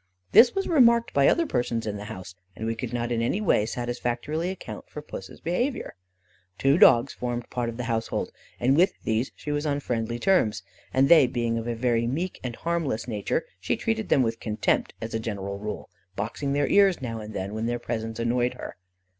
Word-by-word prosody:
This 240 0 +7
was 390 - 0
remarked 235 -7 +4
by 140 -1 +4
other 335 - +3
persons 120 - -1
in 105 -1 -3
the 100 - -7
house, 95 -2 -8 0.2
and 110 - -5
we 115 - 0
could 115 +1 -5
not 120 0 -2
in 115 -1 0
any 120 - 0
way 165 - +2
satisfactorily 120 +7 -2
account 190 - -8
for - - -7
Puss's 95 -10 -9
behaviour. 245 - -2 0.6
Two 140 +5 +3
dogs 120 +3 +6
formed 120 -1 -4
part 120 -1 -1
of 115 - -7
the 125 - -3
household, 115 -1 -2 0.3
and 130 +3 +3
with 180 +5 +3
these 115 +3 0
she 150 - -5
was 145 +1 -1
on 145 -1 0
friendly 120 -3 -2
terms, 110 - +2 0.3
and 135 +1 +3
they 155 -5 +7
being 120 -1 -1
of 115 0 -3
a 120 - -1
very 115 -1 +1
meek 170 +9 -2
and 120 -2 -4
harmless 165 -10 -2
nature, 105 -4 -1
she 95 - -1
treated 225 -1 -2
them 135 - +4
with 115 -1 -2
contempt, 110 -1 0
as 115 0 -5
a 110 - 0
general 100 -3 -4
rule, 105 +1 -5 0.3
boxing 125 +8 -2
their 145 0 +2
ears 195 -3 +4
now 115 -4 -4
and 105 0 -8
then, 95 +2 -3
when 110 +1 -2
their 120 0 0
presence 115 -2 -4
annoyed 120 +1 0
her. - - -8
120 Hz, 205 wpm, -26 LUFS, 115-145 Hz, 0.6 s, This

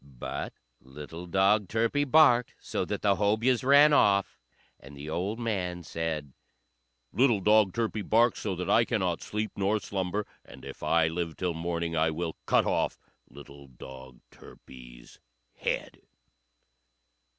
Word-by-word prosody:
But 65 -4 -7 0.2
little 75 +6 -10
dog 95 +3 +2
Turpie 115 +7 0
barked 125 -5 +4
so - - -3
that - - -5
the 100 -2 +3
Hobyahs 110 +5 +1
ran 145 +3 +6
off; 100 -8 +2 0.4
and 70 +1 -14
the 75 +2 -7
old 95 +7 -2
man 95 -7 -3
said, 80 -4 -4 0.8
"Little 120 -1 +3
dog 105 0 +4
Turpie 110 -1 -2
barks 115 +3 +2
so 100 -4 -3
that 90 0 -5
I 115 - +4
cannot 95 -8 -1
sleep 105 0 -4
nor 100 +2 0
slumber, 100 +1 -3 0.2
and - - -14
if - - -10
I 80 -1 +2
live 85 -1 -4
till 90 -2 -2
morning 85 0 -3
I 80 0 +2
will 80 +1 -4
cut - - +3
off - - -1 0.3
little 70 0 -13
dog 65 0 -13
Turpie's - - -15 0.3
head." - - -4
95 Hz, 140 wpm, -28 LUFS, 80-110 Hz, 0.8 s, ran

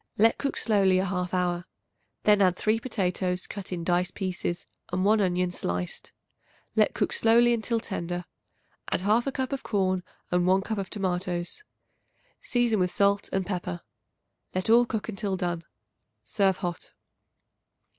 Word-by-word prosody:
Let 225 +2 +4
cook 280 - -1
slowly 195 -4 +3
a 185 - +1
half 180 -1 -2
hour. 180 -1 0 0.6
Then 210 -1 +5
add 185 -2 +4
3 215 +4 +1
potatoes, 185 -6 -1
cut 195 -2 -7
in 175 -2 -3
dice 180 +1 +1
pieces, 180 -2 -3 0.3
and 185 +1 0
1 215 +1 +4
onion, 180 -1 +1
sliced. 90 - -4 0.6
Let 215 -1 +3
cook - - 0
slowly 235 +1 +5
until 230 0 0
tender. 175 -4 -4 0.6
Add - - 0
1/2 225 +7 +2
cup 265 0 -2
of 275 - -2
corn 185 -3 0 0.3
and 180 0 +2
1 190 +1 +4
cup 220 0 -3
of 195 - -4
tomatoes; 180 - -2 0.8
season 240 -4 +1
with 180 0 +2
salt 200 +2 +2
and 190 -1 0
pepper. 175 - -4 0.7
Let 185 +4 +1
all 240 +1 +6
cook 220 -4 -3
until 195 -3 -2
done. 175 -3 -2 0.6
Serve 190 - +2
hot. 175 -3 -5
190 Hz, 150 wpm, -27 LUFS, 180-215 Hz, 0.8 s, all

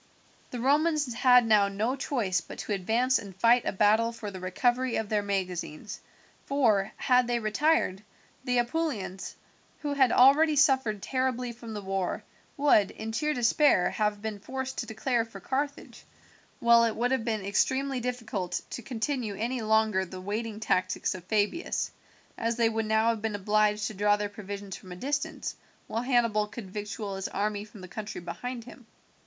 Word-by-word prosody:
The 245 - -5
Romans 290 +1 +2
had 250 0 +5
now 210 -3 +5
no 215 +6 -1
choice 225 -10 -1
but - - -11
to 210 - -3
advance 230 +7 +2
and 200 -4 -10
fight 230 +5 +4
a - - +2
battle 215 +3 +3
for 215 -3 -7
the 190 - -8
recovery 240 +7 0
of 220 -2 -2
their 210 -1 +1
magazines, 190 -1 -4 0.5
for, 225 -9 +2
had 250 -2 +3
they 240 0 +1
retired, 215 -2 +1 0.4
the 250 -2 0
Apulians, 240 - -2 0.5
who 290 -1 -2
had 265 -4 +4
already 295 +5 +6
suffered 265 -7 +3
terribly 255 -2 -1
from 230 -2 -9
the 205 - -5
war, 190 -1 -2 0.3
would, 275 -9 +4
in 220 0 -6
sheer 300 +7 0
despair, 245 -4 +3
have 210 -1 -1
been 215 -2 -4
forced 265 +4 -5
to - - -3
declare 235 +1 0
for 225 -3 -11
Carthage, 280 +7 -4 0.6
while 235 0 +6
it 230 -2 +1
would 245 +2 0
have 265 -4 +1
been 220 -4 -2
extremely 265 +6 +1
difficult 225 -7 -3
to - - -5
continue 235 -2 -3
any 235 +4 -2
longer 220 -3 +2
the 185 0 -8
waiting 210 +3 -4
tactics 185 -4 0
of 185 -2 -9
Fabius, 210 - 0 0.5
as 230 0 0
they 230 -1 +3
would 225 -1 -2
now 220 +1 +3
have 225 -2 -1
been 220 -1 -2
obliged 210 +1 +2
to 220 - -3
draw 205 +1 +3
their 205 0 -3
provisions 200 -1 -7
from 185 - -12
a - - -6
distance, 290 - -3 0.3
while 225 - -2
Hannibal 235 -4 +2
could 210 -3 -9
victual 205 -1 -5
his 195 - -3
army 205 0 -2
from 210 -1 -13
the 185 - -8
country 215 +3 -6
behind 235 +8 -6
him. 245 0 -14
225 Hz, 175 wpm, -28 LUFS, 205-250 Hz, 0.6 s, already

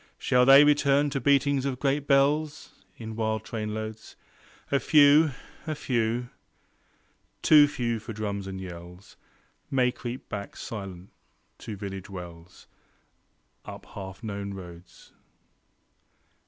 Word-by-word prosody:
Shall 125 0 +2
they 135 +1 +9
return 145 -1 +3
to 135 -1 -2
beatings 140 -1 +2
of 135 -2 -2
great 140 +1 0
bells 145 +2 +1 0.2
In 110 -1 -7
wild 110 -1 -1
trainloads? 110 0 -6 0.6
A 140 - +3
few, 150 +3 +6 0.4
a 155 - -2
few, 120 -2 -1 1.1
too 150 -1 +7
few 120 -5 -2
for 110 +2 -8
drums 100 -2 -4
and 95 -1 -6
yells, 90 +1 -10 0.5
May 125 -2 +2
creep 120 +1 -7
back, 100 -2 -6
silent, 95 -4 -8 0.5
to 110 - -7
still 100 0 -6
village 95 -1 -8
wells 90 -2 -10 1.0
Up - - -10
half 95 +2 -9
known 100 -2 -5
roads. 90 -2 -13
115 Hz, 120 wpm, -27 LUFS, 100-140 Hz, 1.1 s, they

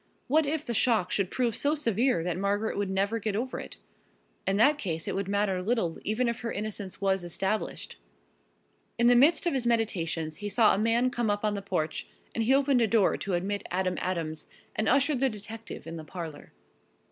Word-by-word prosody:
What 305 +2 +3
if 305 +1 -1
the 240 - -2
shock 225 -5 +2
should 195 -3 +1
prove 240 -4 0
so 290 +2 +2
severe 235 - +2
that 175 -1 -1
Margaret 200 +3 0
would 200 -1 -1
never 200 +4 0
get 215 -1 -2
over 250 +4 -2
it? - - -9 0.7
In 195 +1 +2
that 290 +7 +4
case 165 - -3
it - - -1
would 195 0 -2
matter 200 -2 0
little 195 -5 0
even 225 +4 0
if 235 0 -1
her 230 - -3
innocence 205 -2 -5
was 195 -2 +1
established. 190 +5 -3 1.0
In 235 - +2
the 245 +1 +7
midst 305 +8 +5
of 345 - +1
his 255 -3 0
meditations 165 -9 0
he 205 0 -4
saw 215 +2 +5
a - - +1
man 230 +3 +2
come 240 -3 -1
up 205 +1 0
on 210 - +1
the 200 - -3
porch 160 -5 -2 0.3
and 230 - 0
he 260 +4 +4
opened 275 -2 +3
the 230 - +3
door 215 -2 +3
to 195 -2 -2
admit 200 +3 -2
Adam 185 0 0
Adams 165 -4 -3 0.3
and 215 - +1
ushered 280 +1 +3
the 270 0 +3
detective 220 +1 -8
in 165 0 -6
the 160 - -7
parlor. 160 -1 -8
210 Hz, 205 wpm, -28 LUFS, 190-240 Hz, 1.0 s, the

